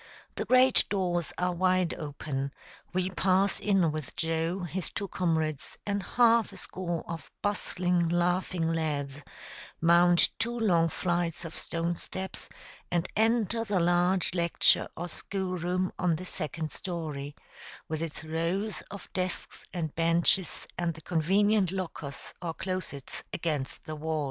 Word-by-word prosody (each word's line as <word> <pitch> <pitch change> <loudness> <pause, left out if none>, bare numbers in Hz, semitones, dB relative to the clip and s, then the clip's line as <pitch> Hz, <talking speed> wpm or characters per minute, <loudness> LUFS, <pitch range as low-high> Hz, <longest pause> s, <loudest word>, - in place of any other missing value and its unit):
The - - -3
great 255 0 +6
doors 175 -4 0
are 180 0 +1
wide 185 0 +2
open; 140 -2 -4 0.4
we 185 +1 0
pass 190 +1 +2
in 195 -6 +3
with 155 -4 -6
Joe, 165 +3 0
his 180 0 -2
two 200 - -4
comrades, 160 -5 -1
and 200 -1 0
half 230 +3 +4
a - - -11
score 175 -3 -3
of 165 -1 -6
bustling, 180 -4 +1
laughing 175 -1 +1
lads, 145 -3 -2 0.6
mount 170 +1 +5
two 235 +2 0
long 175 -7 +4
flights 175 -1 -1
of 165 - -7
stone 170 +1 -1
steps, 190 0 -5 0.4
and 175 0 +1
enter 225 0 +2
the 205 -4 +1
large 175 +2 +3
lecture 170 -2 +4
or 175 +2 -3
school 185 +2 -3
room 180 +2 0
on 175 -3 +3
the 180 +4 -6
second 160 -3 -3
story, 150 -6 -5 0.5
with 155 0 -3
its 165 -1 -4
rows 170 +7 -1
of 200 -1 -8
desks 185 -2 -3
and 160 -5 -3
benches, 170 +2 +2
and 170 -2 0
the 160 - -11
convenient 190 +4 +3
lockers 165 -7 -5
or 165 -2 -3
closets 185 -7 -4
against 150 -5 -2
the 155 - -5
walls. 155 +1 -2
175 Hz, 140 wpm, -29 LUFS, 160-185 Hz, 0.6 s, great